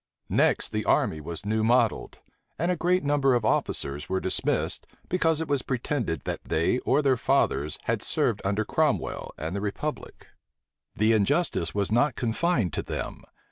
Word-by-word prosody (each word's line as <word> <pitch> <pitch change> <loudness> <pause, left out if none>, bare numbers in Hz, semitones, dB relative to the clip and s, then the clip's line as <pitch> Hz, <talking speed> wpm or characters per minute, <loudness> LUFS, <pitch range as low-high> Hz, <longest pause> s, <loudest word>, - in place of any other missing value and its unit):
Next, - - +2
the - - -2
army 80 - +1
was 80 +3 -7
new 110 +1 0
modelled; 120 0 +1 0.4
and 170 +4 0
a - - +1
great 180 +2 +1
number 140 -2 +3
of 120 -3 0
officers 70 -8 0
were 95 - 0
dismissed, 95 - -1 0.2
because 165 -3 +2
it 160 - -3
was 140 -2 +1
pretended 125 - -2
that - - -4
they 85 +10 +1
or 145 +4 +1
their 135 -2 +3
fathers 75 -8 +1
had - - -1
served - - 0
under 100 +2 0
Cromwell - - 0
and 80 +4 -4
the 100 - -2
republic. 125 +9 -5 0.7
The 110 +2 +3
injustice 110 - +1
was 100 0 0
not 120 +3 +3
confined 120 - 0
to - - -1
them. - - -5
115 Hz, 165 wpm, -26 LUFS, 95-145 Hz, 0.7 s, number